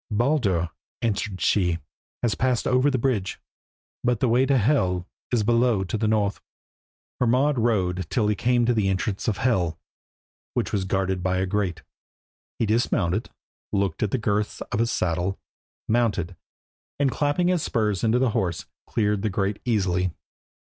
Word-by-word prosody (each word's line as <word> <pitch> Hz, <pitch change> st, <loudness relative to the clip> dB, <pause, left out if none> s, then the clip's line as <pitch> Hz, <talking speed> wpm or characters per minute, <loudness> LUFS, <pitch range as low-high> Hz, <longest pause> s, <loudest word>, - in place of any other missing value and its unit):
"Baldur," 105 Hz, -, +1 dB, 0.3 s
answered 105 Hz, -3 st, -1 dB
she, 90 Hz, -5 st, +2 dB, 0.5 s
"has 115 Hz, -3 st, +2 dB
passed 130 Hz, -3 st, 0 dB
over 130 Hz, +3 st, +3 dB
the 135 Hz, -, +1 dB
bridge, 115 Hz, -6 st, -1 dB, 0.6 s
but 120 Hz, -2 st, +1 dB
the 130 Hz, -, +2 dB
way 125 Hz, +3 st, +3 dB
to 140 Hz, 0 st, +4 dB
Hel 100 Hz, -8 st, +1 dB, 0.2 s
is 120 Hz, -4 st, +2 dB
below 115 Hz, -2 st, +3 dB
to 95 Hz, -, -3 dB
the 110 Hz, 0 st, 0 dB
north." 105 Hz, -2 st, +1 dB, 0.8 s
Hermod 130 Hz, +3 st, +3 dB
rode 95 Hz, -6 st, +1 dB
on 95 Hz, -, -3 dB
till 110 Hz, -3 st, +1 dB
he 105 Hz, -, +3 dB
came 120 Hz, +3 st, +2 dB
to 120 Hz, -, +3 dB
the 105 Hz, -4 st, +1 dB
entrance 95 Hz, +3 st, -2 dB
of 105 Hz, -4 st, +1 dB
Hel, 90 Hz, -10 st, +1 dB, 0.8 s
which -, -, -1 dB
was 100 Hz, -2 st, 0 dB
guarded 95 Hz, -1 st, 0 dB
by 95 Hz, 0 st, 0 dB
a 95 Hz, -, +1 dB
grate. 95 Hz, -4 st, -2 dB, 0.7 s
He 115 Hz, -, +1 dB
dismounted, 105 Hz, -3 st, +1 dB, 0.4 s
looked 100 Hz, -4 st, 0 dB
to 110 Hz, -, +1 dB
the 120 Hz, -, -1 dB
girths 105 Hz, -2 st, -1 dB
of -, -, 0 dB
his 115 Hz, 0 st, +1 dB
saddle, 90 Hz, 0 st, -1 dB, 0.5 s
mounted, 105 Hz, -7 st, +1 dB, 0.6 s
and 140 Hz, -2 st, +3 dB
clapping 150 Hz, +7 st, +1 dB
his 180 Hz, -3 st, +2 dB
spurs 105 Hz, -7 st, 0 dB
into 115 Hz, +1 st, +3 dB
the 125 Hz, -2 st, +2 dB
horse, 90 Hz, -5 st, -1 dB, 0.2 s
cleared 105 Hz, -2 st, 0 dB
the 110 Hz, -, 0 dB
grate 100 Hz, +1 st, -1 dB
easily. 95 Hz, -6 st, +1 dB
105 Hz, 165 wpm, -25 LUFS, 95-120 Hz, 0.8 s, to